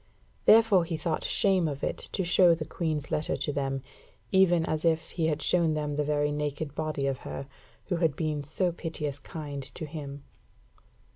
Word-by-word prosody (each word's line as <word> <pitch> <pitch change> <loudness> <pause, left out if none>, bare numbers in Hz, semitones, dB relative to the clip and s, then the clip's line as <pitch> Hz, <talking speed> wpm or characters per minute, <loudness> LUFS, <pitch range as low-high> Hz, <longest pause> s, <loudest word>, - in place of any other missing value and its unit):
Therefore 220 -5 +6
he 165 -1 -3
thought 155 0 -2
shame 190 -4 +2
of 140 -2 -5
it - - -1
to 190 - 0
show 175 -1 +5
the 155 -1 -5
Queen's 155 -4 -3
letter 150 - 0
to 145 - -1
them, 135 -1 -2 0.5
even 175 -4 +4
as 155 -1 -2
if 160 -1 +1
he 165 -2 0
had 155 -1 0
shown 165 -3 +3
them 150 -1 -2
the 150 - +1
very 145 0 +1
naked 150 0 -3
body 155 -2 -2
of 135 -2 -1
her, 135 - -6 0.4
who 180 - -1
had 165 -4 +1
been 150 -3 -2
so 175 +5 0
piteous 150 -4 -4
kind 145 -2 -6
to 155 +4 -6
him. 145 -2 -7
155 Hz, 185 wpm, -28 LUFS, 145-170 Hz, 0.5 s, Therefore